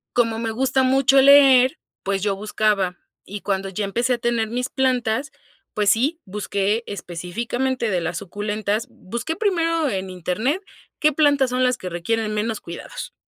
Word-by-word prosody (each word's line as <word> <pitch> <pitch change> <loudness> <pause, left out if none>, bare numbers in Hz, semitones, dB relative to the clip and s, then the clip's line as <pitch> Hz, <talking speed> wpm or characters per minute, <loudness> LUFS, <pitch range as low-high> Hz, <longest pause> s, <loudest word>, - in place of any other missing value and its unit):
como 230 -2 +2
me 225 0 -2
gusta 260 +3 +1
mucho 270 +1 +4
leer, 270 -2 +6 0.2
pues, 195 -1 -1
yo 200 -2 +1
buscaba 205 -3 0 0.3
y 205 +1 -8
cuando 195 -1 -1
ya 200 +2 -3
empecé 235 +5 0
a - - -4
tener 235 -2 0
mis 250 +3 -2
plantas, 255 0 0 0.4
pues, 210 -1 +2
sí, 285 +10 +1
busqué 205 +2 -1
específicamente 230 +7 -3
de 180 -3 0
las 170 0 -3
suculentas, 210 +2 -3
busqué 235 - -5
primero 330 -6 +1
en 190 -1 -3
internet, 215 - -2 0.4
qué 305 0 +3
plantas 285 -3 +3
son 255 +1 0
las 250 -1 +2
que 185 - -6
requieren 215 +6 -1
menos 220 +1 -2
cuidados. 170 - -8
225 Hz, 160 wpm, -22 LUFS, 200-260 Hz, 0.4 s, leer